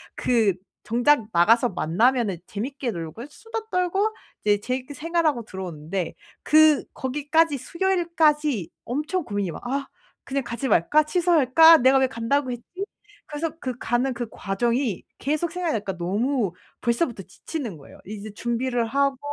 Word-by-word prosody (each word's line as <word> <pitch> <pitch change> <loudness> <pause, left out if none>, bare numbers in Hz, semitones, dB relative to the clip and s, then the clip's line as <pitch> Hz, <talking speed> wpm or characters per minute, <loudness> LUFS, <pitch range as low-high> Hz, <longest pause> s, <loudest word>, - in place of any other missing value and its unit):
그 225 -5 +2 0.3
정작 245 +2 +3
나가서 230 +8 +4
만나면은 210 +4 +1
재밌게 255 +4 -4
놀고 170 +6 -6
수다 450 +6 -7
떨고 385 +4 +1 0.3
이제 205 -1 +3
재밌게 255 +5 -4
생활하고 310 -4 0
들어오는데 180 -2 -5 0.3
그 310 -1 +5
거기까지 295 +3 +1
수요일까지 310 - +1 0.2
엄청 305 +8 -2
고민이 205 -6 -2
막 165 - -9
'아 275 +2 -2 0.4
그냥 275 0 -2
가지 235 +3 -4
말까? 280 - +4
취소할까? 325 -1 +6
내가 260 +1 +5
왜 265 - +4
간다고 255 +2 -1
했지?' 240 -1 -5 0.7
그래서 305 +2 -2
그 255 -5 -4
가는 245 +2 0
그 240 -1 -4
과정이 235 +2 -1 0.2
계속 305 +4 -1
생각이 355 -2 -1
나니까 200 -4 -3
너무 210 +5 0 0.3
벌써부터 235 -2 0
지치는 225 - -6
거예요. 140 - -15
이제 210 +1 -7
준비를 240 +2 -1
하고 275 +2 +1
255 Hz, 325 characters per minute, -24 LUFS, 215-300 Hz, 0.7 s, 취소할까